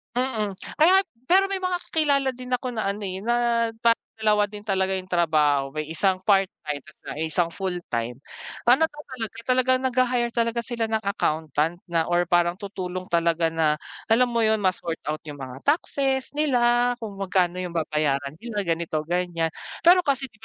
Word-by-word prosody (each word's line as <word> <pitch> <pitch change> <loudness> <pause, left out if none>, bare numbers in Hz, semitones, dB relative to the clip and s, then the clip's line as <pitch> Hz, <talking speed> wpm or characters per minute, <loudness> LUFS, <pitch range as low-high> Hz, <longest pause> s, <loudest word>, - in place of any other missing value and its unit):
Mm, 225 -6 -1 0.2
kaya 360 +6 +6
at 390 - -16 0.2
pero 385 +5 +4
may 390 - -1
mga 365 -1 -1
kakilala 285 -4 +2
din 255 0 -6
ako 250 +1 -1
na 225 -4 -3
ano 200 +2 -2
eh 190 -2 -3
na 235 +2 +1 0.5
parang 230 0 +3
dalawa 215 -1 +2
din 205 0 -10
talaga 190 -2 0
yung 185 0 -4
trabaho 150 -5 +2
may 155 0 -4
isang 185 +3 +1
part 195 0 +4 0.2
time, 145 -2 -4 0.3
may 155 +2 -3
isang 175 0 +2
full 190 +1 -3 0.2
time. 115 +2 -3 0.5
Ano 265 +6 +6
daw 295 -2 -10
talaga 230 -5 -6
talagang 255 0 +3
naghahire 250 -2 +1
talaga 235 0 0
sila 235 -1 -2
ng 220 0 -1
accountant 160 -4 -1
na 165 -1 +1
or 175 0 +1
parang 175 0 +3
tutulong 185 -2 -5
talaga 170 -1 +2
na 155 -2 +1 0.2
alam 245 +3 +3
mo 235 -1 +1
yun 220 -1 +2
ma 190 - +4
sort 170 -2 -5
out 155 - -1
yung 145 -2 -8
mga 130 -1 -7
taxes 275 -3 +1
nila 245 -4 +3
kung 210 -3 -6
magkano 185 -2 +1
yung 180 -2 -4
babayaran 150 -3 -1
nila 225 -1 -3
ganito 165 -3 -1
ganyan. 170 0 -1 0.3
Pero 360 +1 +6
kasi 270 -2 0
di 220 - -25
200 Hz, 180 wpm, -25 LUFS, 170-245 Hz, 0.5 s, kaya